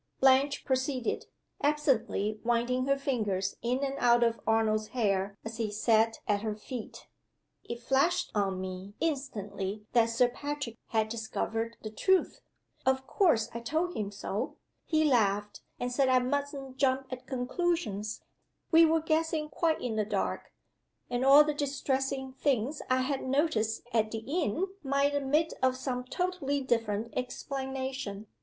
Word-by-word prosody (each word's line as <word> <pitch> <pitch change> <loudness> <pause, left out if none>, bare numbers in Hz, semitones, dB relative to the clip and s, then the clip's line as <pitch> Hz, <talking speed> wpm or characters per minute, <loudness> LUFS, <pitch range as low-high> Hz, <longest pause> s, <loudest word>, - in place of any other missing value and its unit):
Blanche 270 +2 +4
proceeded, 260 -2 -1 0.3
absently 250 -8 +1
winding 240 +2 +1
her 275 0 +3
fingers 215 -9 -1
in 250 +3 0
and 275 -1 -1
out 240 0 +5
of 230 -1 +1
Arnold's 215 -1 +2
hair 200 -3 +1
as 225 0 -5
he 225 -2 -1
sat 220 +1 +2
at 205 -1 +2
her 215 -1 -2
feet: 225 +2 -8 0.6
"It 235 0 -6
flashed 330 +8 +2
on 195 -3 0
me 190 +2 -6
instantly 210 -9 -3
that 230 -1 +4
Sir 240 +2 +4
Patrick 285 -1 -4
had 220 -1 +1
discovered 225 0 -3
the 215 - -5
truth. 380 - +2 0.4
Of 265 0 +1
course 255 - +2
I 235 - -3
told 320 +9 -1
him 205 -2 -2
so. 205 +3 -4 0.3
He 315 -1 +3
laughed, 210 -7 +2 0.2
and 245 0 -2
said 265 +1 +2
I 255 - +5
mustn't 270 +1 -2
jump 265 -1 +2
at 255 -1 -7
conclusions 250 - -1 0.5
We 330 0 +8
were 320 0 +3
guessing 315 -1 0
quite 325 0 0
in 230 -3 -2
the 215 - +2
dark; 210 - -2 0.6
and 245 +1 0
all 280 +2 +9
the 300 0 -1
distressing 270 -2 -1
things 270 +1 0
I 255 0 +3
had 270 +1 -1
noticed 255 -6 0
at 220 -2 +2
the 225 0 -5
inn 315 - 0 0.2
might 280 0 +1
admit 290 +3 +1
of 260 0 +2
some 250 -1 -3
totally 340 -2 -1
different 230 -4 -1
explanation. 260 -4 -4
255 Hz, 150 wpm, -30 LUFS, 220-280 Hz, 0.6 s, all